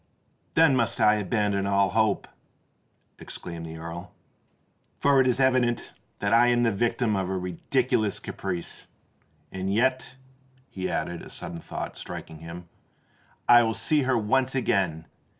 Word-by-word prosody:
"Then 160 -4 +5
must 115 -3 0
I 105 0 +5
abandon 100 -1 0
all 100 -1 +3
hope!" 110 0 +1 0.9
exclaimed 85 -1 -7
the 80 0 -8
Earl; 85 +2 -7 0.8
"for 140 -1 +4
it 130 - +2
is 125 +1 +1
evident 130 -2 +2 0.2
that 100 +1 0
I 120 +1 +6
am 120 0 +3
the 115 - +3
victim 115 +1 0
of 95 -1 -1
a 95 - -1
ridiculous 105 +4 0
caprice. 90 -3 -5 0.6
And 95 0 -3
yet," 130 +4 +1 0.6
he 95 -1 -3
added, 85 +2 -3
a - - -10
sudden 85 0 -5
thought - - -6
striking 80 - -7
him, 85 +2 -9 0.8
"I 120 0 +8
will 115 -1 0
see 155 -2 +1
her 130 -2 +2
once 130 +5 +1
again. 95 -10 0
105 Hz, 145 wpm, -26 LUFS, 90-120 Hz, 0.9 s, I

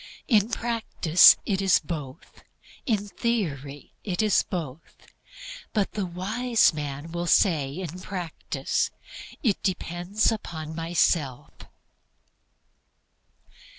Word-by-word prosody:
In 215 -4 +3
practice 225 -8 +5
it 195 -2 0
is 190 -3 +5
both; 150 -2 -8 0.5
in 210 -4 0
theory 145 - -3
it 190 0 -1
is 210 -2 +4
both. 160 -4 -7 0.7
But 205 -3 0
the 200 -3 -3
wise 220 +6 +1
man 145 +1 -6
will 175 +1 -3
say 155 -8 +3
in 180 -1 -6
practice, 180 -3 -3 0.5
"It 215 -7 +1
depends 185 +3 0
upon 160 -7 -5
myself." 165 -5 0
180 Hz, 95 wpm, -26 LUFS, 160-210 Hz, 0.7 s, practice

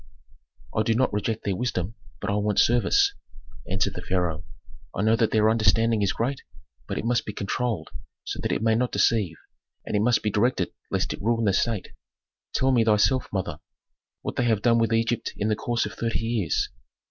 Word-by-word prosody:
"I 110 - +3
do 110 +1 +1
not 130 -1 +1
reject 105 +2 -2
their 100 - -1
wisdom, 110 -3 -2 0.3
but - - -2
I - - 0
want 105 0 0
service," 120 -3 +4 0.6
answered 95 +1 0
the 90 - -6
pharaoh. 90 -4 -1 0.5
"I 100 - 0
know 110 +1 +4
that 115 -1 +2
their 110 -1 +3
understanding 110 0 +3
is 100 -2 +2
great, 125 +7 -2 0.5
but - - -3
it - - -3
must 120 0 +2
be 105 - -6
controlled 115 +3 -2 0.3
so - - -5
that - - -1
it - - -1
may 110 0 +4
not 120 +2 +1
deceive, 105 -9 +2 0.5
and - - -3
it 105 - +3
must 120 +2 +2
be 105 - 0
directed 120 +6 +1 0.2
lest - - -1
it - - -8
ruin 115 +1 +1
the 100 - +3
State. 115 -2 0 0.7
Tell 135 +1 +3
me 120 -3 +4
thyself, 110 +4 +3
mother, 90 -6 -3 0.6
what - - -4
they 125 - +2
have 110 -4 +1
done 115 -1 +4
with 115 -1 +1
Egypt 115 0 0
in 105 - 0
the 110 - +2
course 120 +2 -1
of - - -6
thirty 115 -1 -1
years? 115 -6 0
110 Hz, 200 wpm, -25 LUFS, 100-115 Hz, 0.7 s, service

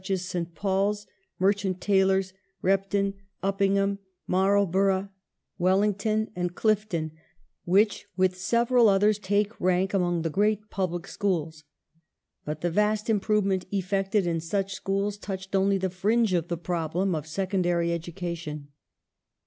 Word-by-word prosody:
I - - -25
1891] 190 +2 -1 0.5
SECONDARY 190 0 +1
SCHOOLS 190 0 -16 0.3
405 195 0 0 0.3
Mai'lborough, 195 0 +2 0.5
Wellington, 205 +4 +1
and 175 0 -2
Clifton, 210 -7 0 0.5
which, 200 +4 +2
with 185 0 +2
several 235 +4 +3
others, 205 +1 +3
take 205 +2 -1
rank 185 +2 +1
among 175 -3 +1
the 165 - -1
great 210 +3 0
"Public" 175 -2 -2
schools. 165 -7 -2 0.8
But 150 0 -5
the 175 - 0
vast 210 +4 +1
im 210 - +2
provement 195 -3 +1
effected 195 +1 0
in 170 -1 0
such 195 +4 -2
schools 200 +1 -2
touched 190 -1 -5
only 195 +1 +3
the 190 -1 -2
fringe 210 +3 +1
of 170 -2 0
the 170 - -2
problem 175 +2 -1
of 155 -1 -3
secondary 175 -1 0
education. 170 -3 -5
195 Hz, 120 wpm, -27 LUFS, 175-200 Hz, 0.8 s, several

